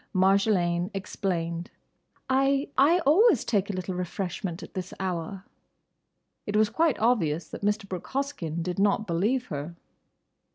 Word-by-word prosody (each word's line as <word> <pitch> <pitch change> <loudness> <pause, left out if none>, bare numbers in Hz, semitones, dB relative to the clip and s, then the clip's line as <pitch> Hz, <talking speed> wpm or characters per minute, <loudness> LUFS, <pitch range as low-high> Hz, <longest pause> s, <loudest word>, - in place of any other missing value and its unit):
Marjolaine 185 -2 +3
explained. 175 -3 -3 0.6
"I—I 275 +4 +3
always 350 - +5
take 200 -3 +1
a - - -1
little 185 0 -3
refreshment 180 0 -4
at - - -11
this 185 -1 -5
hour." 185 0 -3 1.0
It 205 - -2
was 215 0 +4
quite 320 -4 +2
obvious 170 -9 +1
that - - -8
Mr. 205 0 0
Brooke 185 -3 -6
Hoskyn 260 - -3
did 180 +1 -3
not 205 +2 +2
believe 210 +9 0
her. 150 +2 -5
195 Hz, 130 wpm, -27 LUFS, 175-235 Hz, 1.0 s, always